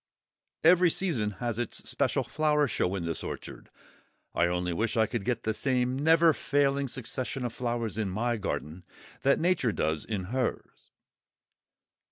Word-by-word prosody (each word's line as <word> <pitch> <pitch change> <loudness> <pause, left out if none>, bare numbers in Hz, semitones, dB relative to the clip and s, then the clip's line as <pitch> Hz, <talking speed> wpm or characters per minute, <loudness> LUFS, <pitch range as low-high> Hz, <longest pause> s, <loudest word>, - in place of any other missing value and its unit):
Every 175 +2 +6
season 155 - +1
has 120 +1 -3
its 120 - -4
special - - 0
flower 150 -1 +1
show 95 -5 -1
in 90 -3 -3
this 85 -1 -3
orchard. - - -7 0.6
I 85 - +3
only 90 0 -1
wish 110 +6 -1
I 110 - +5
could 100 - -3
get 120 0 -1
the 110 - 0
same 125 +1 0
never 165 +2 +5
failing 140 -1 +1
succession 130 +1 -3
of 120 - -3
flowers 120 -3 -2
in 105 -3 -1
my 115 +5 -1
garden 90 -4 -4 0.4
that 140 +1 +3
Nature 165 -8 +2
does 80 -1 -1
in 105 -4 -3
hers. 130 -2 -3
120 Hz, 155 wpm, -29 LUFS, 105-140 Hz, 0.6 s, Every